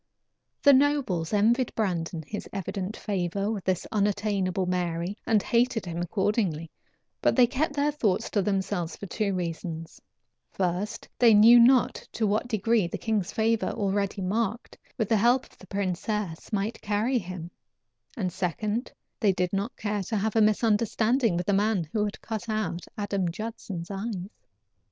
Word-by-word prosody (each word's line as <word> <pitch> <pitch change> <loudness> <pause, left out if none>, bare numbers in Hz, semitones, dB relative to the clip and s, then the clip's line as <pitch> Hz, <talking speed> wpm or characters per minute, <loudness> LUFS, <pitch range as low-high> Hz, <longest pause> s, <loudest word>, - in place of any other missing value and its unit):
The 285 - +8
nobles 260 - +2
envied 225 +4 +2
Brandon 170 -6 -1
his 210 +6 -6
evident 195 +1 -4
favor 195 0 -2
with 205 -4 -4
this 185 -2 0
unattainable 200 -3 0
Mary 175 +1 -1
and 215 -3 +3
hated 235 -3 +1
him 170 -1 -4
accordingly, 180 -3 -1 0.5
but - - +3
they 250 - +7
kept 285 +5 -1
their 290 +1 +2
thoughts 220 -10 0
to 205 - +2
themselves 190 -3 -1
for - - -8
two 200 0 -1
reasons: 165 -2 -5 0.5
First, 185 +3 -2
they 235 -3 +7
knew 230 +3 +8
not 245 +1 +5 0.2
to 220 - 0
what 210 +3 0
degree 220 -3 +1
the - - -4
king's 210 -4 -1
favor, 225 0 +1
already 200 -1 -1
marked, 220 +4 -2 0.2
with 220 -4 0
the 220 - +3
help 240 +5 +3
of - - -23
the 190 - -14
princess 195 -1 -3
might 210 +2 -2
carry 215 +5 +1
him; 180 -3 -7 0.7
and 185 -5 -2
second, 205 - -2 0.3
they 210 -5 +4
did 180 -1 -1
not 200 +5 -2
care 210 -1 -2
to 215 +4 -2
have 215 +2 -1
a 225 - +5
misunderstanding 220 0 +2
with 175 - -2
the 200 - +1
man 200 -4 +1
who 210 - +1
had 205 - -5
cut 225 +1 -5
out 215 -5 -2
Adam 200 -3 -1
Judson's 195 -2 -6
eyes. 195 -1 -4
205 Hz, 160 wpm, -27 LUFS, 185-225 Hz, 0.7 s, The